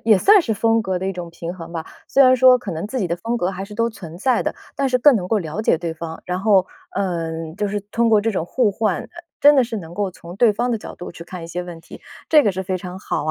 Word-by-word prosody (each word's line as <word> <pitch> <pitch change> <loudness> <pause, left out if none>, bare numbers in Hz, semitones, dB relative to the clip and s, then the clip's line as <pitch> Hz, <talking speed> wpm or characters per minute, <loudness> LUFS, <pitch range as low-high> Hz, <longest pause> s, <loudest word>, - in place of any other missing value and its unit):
也 215 -4 +5
算 405 - +6
是 225 - -1
风 225 +2 +2
格 190 -2 -1
的 190 - -3
一 195 - -1
种 175 -2 -7
平 170 +1 -6
衡 170 -1 -9
吧。 165 -1 -5 0.2
虽 275 - +5
然 255 0 +7
说 255 0 +7
可 200 -7 -6
能 165 +5 -4
自 260 +4 -4
己 190 - 0
的 170 +1 -2
风 230 +6 -2
格 180 -4 0
还 195 0 -5
是 210 +1 -11
都 230 +1 +1
存 175 -7 -10
在 255 +4 +2
的， - - -2 0.2
但 275 - +1
是 250 -1 +2
更 270 -1 +6
能 180 -2 -3
够 220 - +2
了 175 +4 -4
解 165 - +2
对 170 -2 -4
方， 165 0 -7
然 180 +1 -2
后， 195 -3 +4 0.3
呃， 165 -4 -3
就 210 -1 -1
是 205 +1 -2
通 230 +3 0
过 215 -2 +5
这 225 +2 0
种 185 -5 -2
互 220 +3 +1
换， 220 +1 0
呃 - - -13 0.3
真 290 +1 +7
的 265 - +5
是 230 -1 -4
能 170 -3 -8
够 200 -2 -1
从 175 0 -11
对 220 +1 +4
方 240 +4 -1
的 225 - -1
角 - - -10
度 175 - -8
去 170 - -10
看 175 -1 -8
一 - - -7
些 175 +2 -4
问 175 -2 -9
题， - - -13 0.3
这 305 -2 +6
个 210 - +2
是 190 0 -4
非 185 0 -1
常 180 +1 -8
好 150 - -3
啊， 155 - 0
195 Hz, 325 characters per minute, -21 LUFS, 175-225 Hz, 0.3 s, 然